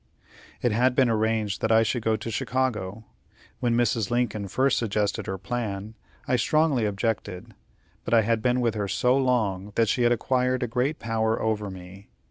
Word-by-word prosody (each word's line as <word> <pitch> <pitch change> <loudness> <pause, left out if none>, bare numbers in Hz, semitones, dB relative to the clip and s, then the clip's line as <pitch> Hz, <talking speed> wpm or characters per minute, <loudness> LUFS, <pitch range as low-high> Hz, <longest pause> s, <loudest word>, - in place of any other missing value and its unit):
It 120 - +2
had 125 +3 +2
been 130 -3 +3
arranged 110 -2 0
that 110 - +1
I 110 0 +5
should 115 +2 -1
go 110 0 +1
to 110 +1 -5
Chicago. 110 -5 -2 0.5
When 120 -1 +1
Mrs. 115 -3 +1
Lincoln 115 -4 -1
first 130 +7 +1
suggested 105 -2 -1
her 95 - -3
plan, 105 -1 -4 0.3
I 130 -3 +2
strongly 145 -2 +2
objected; 100 -2 -3 0.5
but - - -5
I 115 - +6
had 115 +1 +1
been 125 +1 +1
with 115 -2 +1
her 105 -2 -2
so 125 +5 +2
long, 105 -7 0
that 115 -2 +2
she 125 - +1
had 120 0 +4
acquired 125 +1 +1
great 130 +6 0
power 110 0 -1
over 105 -2 -1
me. 95 +1 -11
115 Hz, 175 wpm, -25 LUFS, 105-125 Hz, 0.5 s, I